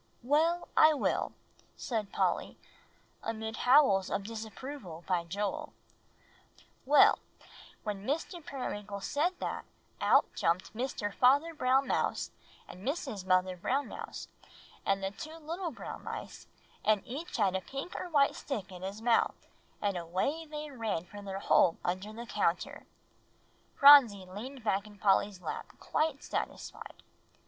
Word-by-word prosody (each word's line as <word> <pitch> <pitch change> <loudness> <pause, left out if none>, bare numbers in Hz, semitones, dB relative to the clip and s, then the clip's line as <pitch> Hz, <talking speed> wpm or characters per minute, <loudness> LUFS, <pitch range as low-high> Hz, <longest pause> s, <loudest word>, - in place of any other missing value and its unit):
"Well, 320 +6 +2
I 310 0 +7
will," - - 0 0.4
said 215 -5 -3
Polly, - - 0 0.6
amid 220 0 -4
howls 245 -8 +5
of 200 - -1
disapproval 220 - -7
by 175 -2 0
Joel. 205 - -3 1.1
"Well, 290 +2 +7 0.6
when 205 -2 -4
Mr. 325 - -3
Periwinkle 205 -8 -5
said 345 - 0
that, - - -3 0.4
out - - +5
jumped 170 +2 0
Mr. 220 -4 -3
Father 285 +9 +4
Brown 265 -2 +3
Mouse, - - 0 0.4
and 180 - -11
Mrs. 265 - -3
Mother 185 0 +3
Brown 260 +10 -1
Mouse, - - -7 0.6
and 195 0 +1
the 195 - -1
two 310 +10 -8
little 335 +3 -4
brown 285 - -8
mice, - - -7 0.4
and 215 -2 +3
each 290 +8 -5
had 195 -4 +2
a 190 - 0
pink 275 - -6
or - - -4
a - - -8
white 285 -4 +4
stick 210 -9 -5
in 180 -1 -9
his 195 +4 -6
mouth, 235 -1 +2 0.4
and 200 -2 +1
away 190 - -2
they 300 -1 -6
ran 220 -9 -2
for 205 +3 -10
their 195 -1 -5
hole 180 -3 +4
under 185 +4 -2
the 230 +2 -7
counter." 205 -7 -1 0.9
Phronsie 260 -9 +8
leaned 235 +7 -8
back 205 -1 0
in 205 -1 -14
Polly's 195 -1 +2
lap - - -4
quite 310 -2 -1
satisfied. - - -5
220 Hz, 140 wpm, -31 LUFS, 195-285 Hz, 1.1 s, Phronsie